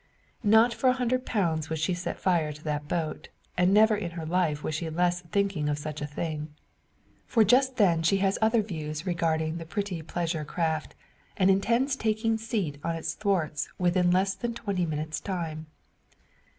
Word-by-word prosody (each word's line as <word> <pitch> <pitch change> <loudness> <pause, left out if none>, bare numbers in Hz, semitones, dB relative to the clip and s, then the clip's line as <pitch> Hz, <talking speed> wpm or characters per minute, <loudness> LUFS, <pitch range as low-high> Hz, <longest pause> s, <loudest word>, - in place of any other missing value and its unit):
Not 220 +3 +5
for 235 +3 0
a - - +4
hundred 255 0 -1
pounds 165 -8 0
would 160 - -2
she 155 +4 0
set 175 +1 -4
fire 170 -5 +1
to 150 +1 -11
that 150 -1 -3
boat, 160 -1 -3 0.3
and 180 +1 +3
never 215 +2 +6
in 200 -4 -3
her 160 - -4
life 160 -3 0
was 155 - -2
she 160 +2 -2
less 175 +2 +1
thinking 180 -3 -1
of 145 - 0
such 150 0 -6
a 145 - -2
thing. 150 0 -4 0.8
For 225 - +4
just 260 +4 +4
then 175 -6 +4
she 165 +4 +3
has 195 0 +1
other 220 0 +3
views 155 -4 -5
regarding 165 -2 0
the - - -5
pretty 185 0 -3
pleasure 165 -1 -2
craft, 160 0 -2 0.4
and 190 0 +5
intends 235 +8 +2
taking 225 -1 0
seat 205 -10 -2
on 165 0 -1
its 160 0 -3
thwarts 170 -7 -1
within 180 0 +2
less 190 +2 +2
than 235 +3 -4
twenty 195 -6 -1
minutes' 155 0 -3
time. 160 -5 -4
175 Hz, 180 wpm, -28 LUFS, 155-205 Hz, 0.8 s, never